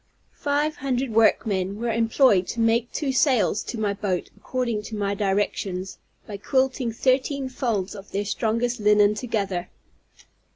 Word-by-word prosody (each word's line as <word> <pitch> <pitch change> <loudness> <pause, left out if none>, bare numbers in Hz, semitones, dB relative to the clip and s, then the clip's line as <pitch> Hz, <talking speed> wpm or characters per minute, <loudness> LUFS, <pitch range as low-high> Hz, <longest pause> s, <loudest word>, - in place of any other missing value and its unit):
Five 295 +1 -1
hundred 260 -2 -1
workmen 205 -3 +2
were 235 0 -1
employed 225 -3 +3
to 235 - -5
make 230 +1 +2
two 285 -3 -1
sails 255 -6 +2
to 235 - -5
my 205 -2 0
boat, 195 -3 -3
according 235 0 -2
to 220 - -6
my 200 -1 -1
directions, 195 -2 -2 0.3
by 205 - -7
quilting 260 +2 0
thirteen 260 +3 0
folds 225 -7 -2
of 200 -1 -11
their 200 +1 -2
strongest 230 +3 -1
linen 210 0 +4
together. 200 -6 -3
225 Hz, 140 wpm, -24 LUFS, 200-255 Hz, 0.3 s, linen